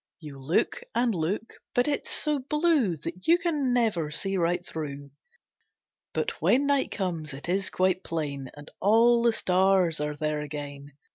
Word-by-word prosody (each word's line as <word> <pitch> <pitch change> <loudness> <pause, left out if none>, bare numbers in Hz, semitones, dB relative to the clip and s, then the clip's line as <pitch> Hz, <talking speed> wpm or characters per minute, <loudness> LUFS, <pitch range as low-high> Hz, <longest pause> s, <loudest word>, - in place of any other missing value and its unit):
You 150 -4 -10
look 155 - 0
and 240 -1 +2
look, 185 +6 -2 0.2
but 245 +2 +3
it's 290 -1 -1
so 300 -2 +1
blue 295 - +1
That 165 +5 -7
you 335 +2 +6
can 305 -7 0
never 220 -11 +1
see 195 +6 0
right 175 0 0
through. 140 -4 -6 1.0
But - - -3
when 270 +3 +3
night 280 -1 +2
comes 165 -7 -3
it 140 - -8
is 190 +2 0
quite 185 0 +1
plain, 140 -5 -4
And 145 +1 -12
all 230 +4 +5
the 235 0 +4
stars 185 -5 +2
are 150 0 -2
there 150 0 -2
again. 145 -1 -7
180 Hz, 160 wpm, -27 LUFS, 150-240 Hz, 1.0 s, you